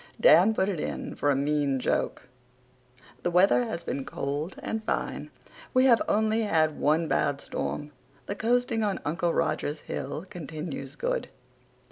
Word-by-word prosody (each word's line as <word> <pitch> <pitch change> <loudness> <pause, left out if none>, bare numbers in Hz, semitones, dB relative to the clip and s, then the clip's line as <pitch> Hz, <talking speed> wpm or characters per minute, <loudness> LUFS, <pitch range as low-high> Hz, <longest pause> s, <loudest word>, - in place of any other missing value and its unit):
Dan 225 - +6
put 190 - +2
it 190 -6 -2
in - - -4
for 145 - 0
a 140 - +4
mean 140 -1 +1
joke. - - -1 1.0
The - - 0
weather 190 +7 +4
has 220 -7 -4
been 140 - -3
cold 145 +6 -4
and 220 0 -3
fine. - - -2 0.5
We 255 +1 +6
have 235 -3 +6
only 220 +1 +2
had 160 -7 +1
one 160 +3 +2
bad 140 -2 +1
storm. 145 +1 -4 0.3
The - - -3
coasting 230 +1 +1
on 205 -3 0
Uncle 170 +3 0
Roger's 150 -2 -1
hill 145 +5 -5
continues 155 -4 -6
good. - - -2
170 Hz, 150 wpm, -27 LUFS, 145-220 Hz, 1.0 s, Dan